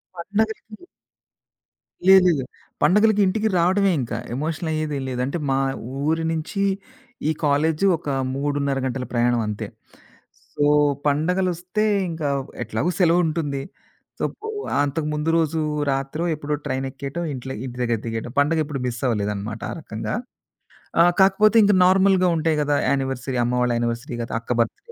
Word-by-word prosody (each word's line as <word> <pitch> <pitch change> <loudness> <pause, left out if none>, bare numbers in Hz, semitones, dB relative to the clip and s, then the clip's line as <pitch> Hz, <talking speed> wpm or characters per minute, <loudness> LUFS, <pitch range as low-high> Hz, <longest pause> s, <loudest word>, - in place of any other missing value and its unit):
పండగలకి 215 - -3 1.2
లేదు 190 -1 +8
లేదు. 145 -6 +1 0.4
పండుగలకి 210 +2 +4
ఇంటికి 215 +3 +1
రావడమే 190 +3 +3
ఇంక. 120 - -6 0.2
ఎమోషనల్ 160 +4 -3
అయ్యేదే 155 -2 -2
లేదు. 125 -1 -3
అంటే, 140 +6 -2
మా 135 - +2 0.5
ఊరి 160 +1 +1
నుంచి 165 +5 -3 0.7
ఈ - - +3
కాలేజు 150 +5 +2
ఒక 155 - -13 0.3
3:30 140 0 -1
గంటల 130 0 -2
ప్రయాణం 120 0 +2
అంతే. 105 -1 -4 0.9
సో 145 - +2 0.4
పండగలొస్తే 180 +6 0 0.3
ఇంకా 160 -3 -2 0.3
ఎట్లాగో 110 +8 -1
సెలవుంటుంది, 165 -5 +2 0.6
సప్పో 440 +1 -4 0.3
అంతకుమందు 150 +1 -2
రోజు 160 0 +1 0.3
రాత్రో, 135 +4 -2
ఎప్పుడో, 150 0 -2
ట్రైన్ 135 -1 -2
ఎక్కేయటం 140 +6 -5
ఇంట్లో 130 0 -6
ఇంటి 125 -1 -7
దగ్గర 120 -1 +1
దిగేటం. 115 +1 -4
పండుగ 150 +3 +2
ఎప్పుడు 145 -2 -4
మిస్సవ్వలేదనమాట 110 -3 -2
ఆ - - -3
రకంగా. 110 -8 -5 0.9
ఆ! - - +8 0.2
కాకపోతే 200 +3 +5
ఇంక 205 0 +4
నార్మల్‌గా 190 0 +4
ఉంటాయి 160 -1 +1
గదా! 145 0 +1
యానివర్సరీ, 135 -1 -1
అమ్మవాళ్ళ 125 0 +1
యానివర్సరీ, 120 +3 -2
లేతే 115 - -5
అక్క 115 - -8
బర్త్‌డే, 115 - -2
150 Hz, 130 wpm, -23 LUFS, 130-175 Hz, 1.2 s, లేదు